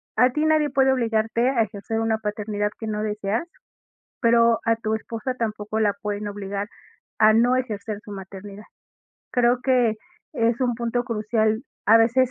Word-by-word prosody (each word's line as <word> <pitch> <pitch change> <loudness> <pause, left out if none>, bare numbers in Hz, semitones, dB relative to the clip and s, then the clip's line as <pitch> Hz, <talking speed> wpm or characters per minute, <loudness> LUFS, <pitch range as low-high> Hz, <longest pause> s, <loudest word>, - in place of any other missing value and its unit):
a 250 +3 +5
ti 300 +3 0
nadie 310 -2 +3
puede 265 0 +3
obligarte 230 0 +1
a 245 -4 +2
ejercer 215 +1 -3
una 225 -1 +1
paternidad 210 -1 -2
que 220 - -5
no 210 0 -2
deseas, 210 - -2 0.7
pero, 230 -1 +4
a 230 -1 +2
tu 220 -1 -2
esposa 230 +3 -4
tampoco 215 -2 -3
la 205 -2 +2
pueden 205 0 -3
obligar 200 0 -4 0.5
a 215 0 +6
no 245 +3 +4
ejercer 215 -4 -3
su 205 - -9
maternidad. 195 +1 -9 0.7
Creo 245 0 +3
que 245 -4 +3 0.4
es 235 -2 +1
un 245 -2 +1
punto 235 +1 -2
crucial, 220 -1 0 0.2
a 225 +2 +7
veces, 245 +3 +3
225 Hz, 160 wpm, -23 LUFS, 210-245 Hz, 0.7 s, a